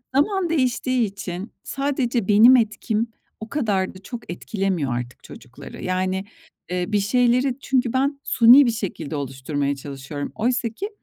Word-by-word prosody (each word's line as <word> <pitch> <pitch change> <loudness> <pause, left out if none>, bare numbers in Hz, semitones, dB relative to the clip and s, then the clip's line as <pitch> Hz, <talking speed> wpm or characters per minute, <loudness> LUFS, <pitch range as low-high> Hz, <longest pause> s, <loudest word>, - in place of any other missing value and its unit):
zaman 365 +4 +2
değiştiği 255 -4 +1
için 195 0 -6
sadece 265 -5 -1
benim 220 +5 +7
etkim 220 -1 0 0.3
o 220 - -8
kadar 205 -10 -1
da 185 - -12
çok 240 -6 -7
etkilemiyor 180 - -2
artık 120 0 -6
çocukları. - - -11
Yani, 185 +1 -1 0.5
ııı, 180 +1 -2
bir 210 - +3
şeyleri 245 +4 +2
çünkü 255 -3 0
ben 275 +2 0
suni 250 +4 +7
bir 235 - +2
şekilde 175 -9 -5
oluşturmaya 140 +1 -2
çalışıyorum. 140 +1 -7
Oysaki 235 - -1
220 Hz, 135 wpm, -22 LUFS, 180-255 Hz, 0.5 s, benim